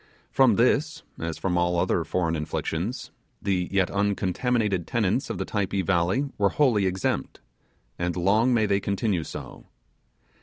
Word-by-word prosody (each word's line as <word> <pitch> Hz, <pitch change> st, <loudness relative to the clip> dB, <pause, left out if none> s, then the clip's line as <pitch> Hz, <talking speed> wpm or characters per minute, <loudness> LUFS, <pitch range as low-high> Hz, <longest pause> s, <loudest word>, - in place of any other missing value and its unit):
From 130 Hz, -5 st, +4 dB
this, 145 Hz, +6 st, +1 dB, 0.2 s
as 85 Hz, -1 st, -4 dB
from 90 Hz, -2 st, 0 dB
all 85 Hz, 0 st, +1 dB
other -, -, +1 dB
foreign 85 Hz, -3 st, -1 dB
inflictions, 80 Hz, +8 st, -3 dB, 0.3 s
the 90 Hz, -3 st, -1 dB
yet 95 Hz, -2 st, +1 dB
uncontaminated 100 Hz, 0 st, 0 dB
tenants 110 Hz, +1 st, 0 dB
of -, -, -3 dB
the -, -, -3 dB
Typee 100 Hz, -3 st, -1 dB
Valley 95 Hz, -, +1 dB
were 100 Hz, -1 st, +4 dB
wholly 115 Hz, -9 st, +2 dB
exempt; 95 Hz, 0 st, -2 dB, 0.6 s
and 85 Hz, 0 st, -1 dB
long 105 Hz, +8 st, +3 dB
may 115 Hz, -3 st, +3 dB
they 100 Hz, -1 st, +2 dB
continue 100 Hz, -3 st, -1 dB
so. -, -, -9 dB
100 Hz, 145 wpm, -25 LUFS, 90-115 Hz, 0.6 s, From